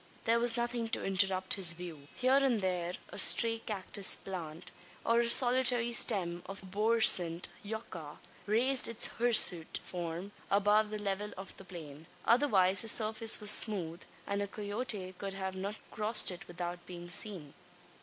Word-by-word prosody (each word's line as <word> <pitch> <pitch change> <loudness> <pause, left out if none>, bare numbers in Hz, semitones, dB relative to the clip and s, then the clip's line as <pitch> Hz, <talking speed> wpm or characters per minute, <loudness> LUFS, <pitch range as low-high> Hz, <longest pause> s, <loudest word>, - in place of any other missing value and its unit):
There 230 +1 +1
was 240 0 +2
nothing 235 -1 -3
to 225 - -4
interrupt 190 -1 0
his 180 -4 +3
view. 165 -5 -11
Here 255 +2 +1
and 255 -5 0
there, 180 -2 -4 0.2
a - - -6
stray 230 -1 +5
cactus 200 -2 0
plant, 170 -4 -9 0.3
or 230 +1 +1
a 235 0 0
solitary 245 -1 +3
stem 180 -7 +1
of 195 +1 -8
the - - -15
arborescent 205 -6 +3
yucca, 200 -8 -9 0.3
raised 250 +5 +2
its 230 -1 0
hirsute 215 -8 +4
form 175 +2 -7 0.2
above 205 +2 +1
the 215 - -6
level 205 0 -5
of 190 +1 -10
the - - -14
plain. 160 -3 -12 0.2
Otherwise 200 -7 +2
the 225 - -2
surface 220 0 +3
was 210 0 +5
smooth; 180 -8 +1 0.2
and 200 0 -4
a 200 - -4
coyote 205 -2 -4
could 195 -1 -7
not 190 -1 -6 0.2
have - - -23
crossed 215 -2 +3
it 180 +2 -11
without 175 0 -8
being 175 -1 -10
seen. 180 -11 -1
200 Hz, 160 wpm, -30 LUFS, 180-230 Hz, 0.3 s, stray